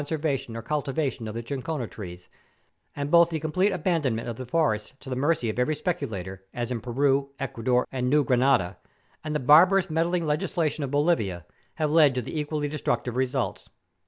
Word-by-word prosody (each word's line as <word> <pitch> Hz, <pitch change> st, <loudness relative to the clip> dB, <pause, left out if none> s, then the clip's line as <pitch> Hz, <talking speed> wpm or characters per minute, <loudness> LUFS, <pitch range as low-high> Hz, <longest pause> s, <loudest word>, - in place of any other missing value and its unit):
servancy 145 Hz, -5 st, -2 dB
or 115 Hz, -, -6 dB
cultivation 140 Hz, -4 st, -2 dB
of 110 Hz, -, -6 dB
the 115 Hz, -, -4 dB
chinchona 135 Hz, +2 st, -3 dB
trees, 90 Hz, -5 st, -9 dB, 0.7 s
and 145 Hz, 0 st, -3 dB
both 170 Hz, 0 st, +6 dB
the 160 Hz, -2 st, -2 dB
complete 180 Hz, +6 st, +1 dB
abandonment 150 Hz, -11 st, 0 dB
of 120 Hz, -, -4 dB
the 130 Hz, +1 st, -7 dB
forests 125 Hz, -7 st, 0 dB
to 130 Hz, -, -10 dB
the -, -, -1 dB
mercy 145 Hz, -1 st, +1 dB
of 110 Hz, +2 st, -2 dB
every 150 Hz, +5 st, +1 dB
speculator, 95 Hz, -, -4 dB
as 120 Hz, 0 st, -3 dB
in 120 Hz, -2 st, -2 dB
Peru, 135 Hz, +3 st, +1 dB
Ecuador, 125 Hz, -2 st, 0 dB
and 125 Hz, -1 st, -1 dB
New 150 Hz, +2 st, +4 dB
Grranada, 125 Hz, -6 st, +2 dB, 0.5 s
and 155 Hz, -1 st, -3 dB
the -, -, +1 dB
barbarous 175 Hz, +7 st, +5 dB
meddling 170 Hz, +2 st, +1 dB
legisla¬ 160 Hz, 0 st, 0 dB
tion 150 Hz, -, -5 dB
of 140 Hz, -, -3 dB
Bolivia 130 Hz, -, +1 dB, 0.3 s
have 155 Hz, -1 st, 0 dB
led 150 Hz, -4 st, +5 dB
to 125 Hz, -, 0 dB
the 155 Hz, -, -4 dB
equally 150 Hz, 0 st, -2 dB
destructive 125 Hz, -5 st, -2 dB
results. 130 Hz, 0 st, -2 dB
140 Hz, 185 wpm, -26 LUFS, 120-155 Hz, 0.7 s, both